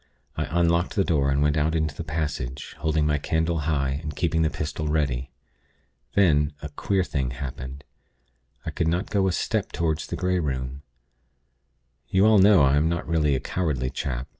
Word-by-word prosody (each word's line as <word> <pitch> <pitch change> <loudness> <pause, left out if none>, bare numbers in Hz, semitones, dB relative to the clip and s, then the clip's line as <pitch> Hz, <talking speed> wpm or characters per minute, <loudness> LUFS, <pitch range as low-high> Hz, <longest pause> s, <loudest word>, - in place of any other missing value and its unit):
I - - -1
unlocked 85 +1 +1
the 100 - +3
door, 70 -6 +1
and 70 +1 +2
went 75 +1 +2
out 80 +2 +1
into 80 -2 0
the 80 - -6
passage, 75 -5 -4
holding 80 -1 +1
my 75 -1 +1
candle 80 +2 0
high, 70 -2 0
and 75 -2 -6
keeping 80 -1 +1
the 80 - +3
pistol 75 -1 -4
ready. 70 -4 0 0.9
Then 75 -6 +3
a 75 - -7
queer 95 +6 0
thing 70 -7 -2
happened. 65 +2 -6 0.8
I - - -3
could 80 - -1
not 90 +5 -1
go 100 -2 +2
a - - +2
step - - -1
toward 80 -2 0
the - - -5
Grey 90 0 0
Room. 65 -3 -3 1.3
You 95 +2 +3
all 110 -1 +6
know 95 -4 +6
I 70 +1 +4
am 80 +2 +2
not 85 +1 -2
really 75 -4 +2
a - - 0
cowardly 65 -6 -2
chap. 65 -1 -3
75 Hz, 185 wpm, -25 LUFS, 70-85 Hz, 1.3 s, all